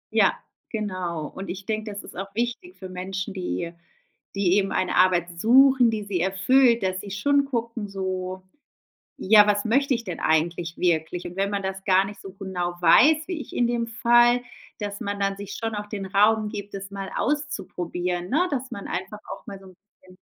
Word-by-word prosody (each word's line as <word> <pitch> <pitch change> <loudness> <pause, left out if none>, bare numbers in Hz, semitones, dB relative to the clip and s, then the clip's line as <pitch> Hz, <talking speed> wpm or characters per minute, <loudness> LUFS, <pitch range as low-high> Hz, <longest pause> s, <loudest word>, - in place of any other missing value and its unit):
Ja, - - +4 0.3
genau. 185 -7 -3
Und 195 - -8
ich 190 +2 -6
denke, 215 -1 -3
das 200 - -7
ist - - -12
auch 195 +2 -4
wichtig 240 +10 -3
für 190 - -8
Menschen, 190 +2 -5
die 180 -2 -3 0.6
die 190 -2 +2
eben 195 -1 +1
eine 185 - 0
Arbeit 175 -2 +2
suchen, 255 +1 +6
die 215 -2 -3
sie 200 -3 -2
erfüllt, 235 +6 +3
dass 185 0 -1
sie 205 - -9
schon 280 +7 +2
gucken 230 -4 -3
so: 185 -1 -4 0.7
„Ja, 210 +1 +6
was 205 0 +1
möchte 270 +4 +2
ich 235 -1 -4
denn 180 -4 -5
eigentlich 165 +2 0
wirklich?“ 170 0 0
Und 175 - -8
wenn 195 +1 +1
man 200 -1 -2
das 190 0 -4
gar 190 0 +4
nicht 200 0 -8
so 195 - -10
genau 185 -3 -3
weiß, 305 - +5
wie 350 -4 -4
ich - - -8
in 240 - +3
dem 235 -1 -1
Fall, 240 +2 +4 0.4
dass 205 -1 -4
man 200 0 -3
dann 195 0 0
sich 200 0 -7
schon 225 -1 -3
auch 210 0 -4
den 205 -2 -5
Raum 210 +2 +3
gibt, 205 -1 -7
es 195 0 -6
mal 195 -1 -6
auszuprobieren, 180 - -2
ne? 335 - +2
Dass 260 -2 -3
man 200 - -7
einfach 190 +3 -4
auch - - -10
mal 200 - -7
so 190 - -16
'n 185 - -15 0.3
bisschen 185 0 -18
200 Hz, 200 wpm, -25 LUFS, 185-230 Hz, 0.7 s, suchen